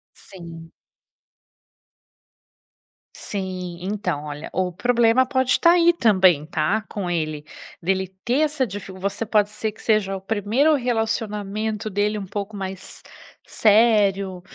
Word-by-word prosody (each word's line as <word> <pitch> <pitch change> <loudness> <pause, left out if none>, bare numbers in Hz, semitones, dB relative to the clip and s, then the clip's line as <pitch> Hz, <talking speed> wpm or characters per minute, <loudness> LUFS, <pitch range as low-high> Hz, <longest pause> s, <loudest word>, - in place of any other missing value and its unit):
Sim. 165 -3 -11 2.4
Sim. 185 -3 -5
Então 185 -6 -3
olha, 150 +1 -7
o 185 0 -1
problema 235 +5 +3
pode 260 -1 +1
tá 335 - +6
aí 345 0 +5
também 185 - +3
tá, 205 +6 0
com 200 -4 -4
ele, 155 -3 -2 0.4
dele 190 +2 0 0.2
ter 255 +5 +1
essa 300 -3 +1
dificu 195 -3 -8
você 200 +4 -2
pode 210 -1 +2
ser 210 +1 -2
que - - -16
seja 210 -3 +1
o 190 - -7
primeiro 225 +9 +2
relacionamento 220 -3 -2
dele 210 +1 0
um 200 - -5
pouco 205 +2 -5
mais 190 -1 -7 0.4
sério, 205 -4 +3
205 Hz, 125 wpm, -22 LUFS, 185-225 Hz, 2.4 s, tá